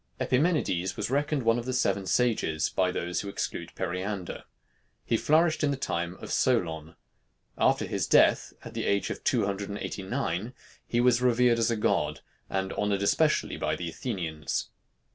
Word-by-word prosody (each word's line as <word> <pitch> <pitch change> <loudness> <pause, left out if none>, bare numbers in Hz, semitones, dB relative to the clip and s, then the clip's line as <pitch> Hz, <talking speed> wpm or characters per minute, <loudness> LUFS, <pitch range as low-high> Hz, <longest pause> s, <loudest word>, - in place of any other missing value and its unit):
Epimenides 125 - +1
was 105 +3 -2
reckoned 145 0 0
one 115 +1 +3
of 120 - -6
the 130 - -2
seven 100 -6 +1
sages 110 -11 +1
by 95 -1 +1
those 90 0 -2
who 100 - -6
exclude - - -4
Periander. 90 +1 -4 0.6
He - - +1
flourished 155 +6 +3
in 145 - +3
the 140 - -1
time 85 -8 -2
of - - -9
Solon. 80 -10 0 0.6
After - - +2
his - - -2
death, - - +4
at - - -8
the - - -3
age 100 0 +1
of - - -6
two - - +2
hundred 100 0 -3
and 100 - -4
eighty 100 - -5
nine, 110 +1 -3 0.3
he 120 - 0
was 125 0 +4
revered 125 -1 +4
as 115 - +2
a 115 - +1
god, 105 - 0 0.3
and 95 0 -2
honored 100 -1 0
especially 100 - +2
by - - -1
the 85 -1 -4
Athenians. 80 -5 -3
105 Hz, 175 wpm, -28 LUFS, 90-125 Hz, 0.6 s, death